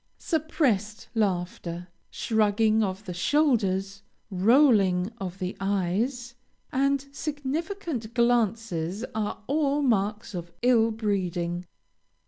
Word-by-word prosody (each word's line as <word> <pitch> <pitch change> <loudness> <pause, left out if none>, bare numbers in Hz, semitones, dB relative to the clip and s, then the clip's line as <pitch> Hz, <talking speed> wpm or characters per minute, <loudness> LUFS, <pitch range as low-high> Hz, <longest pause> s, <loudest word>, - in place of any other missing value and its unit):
Suppressed 280 - -1
laughter, 180 -4 -2 0.2
shrugging 220 0 +2
of 195 0 -2
the 180 - -5
shoulders, 200 - +1 0.3
rolling 200 -3 +4
of 185 -1 -5
the 185 0 -4
eyes, 205 +6 -1 0.4
and 275 +1 +1
significant 295 - -4
glances 225 -5 +1
are 215 -1 -3
all 290 +1 +1
marks 210 -4 0
of 175 -1 -6
ill 235 -2 +5
breeding. 180 -5 -2
215 Hz, 95 wpm, -27 LUFS, 190-255 Hz, 0.4 s, ill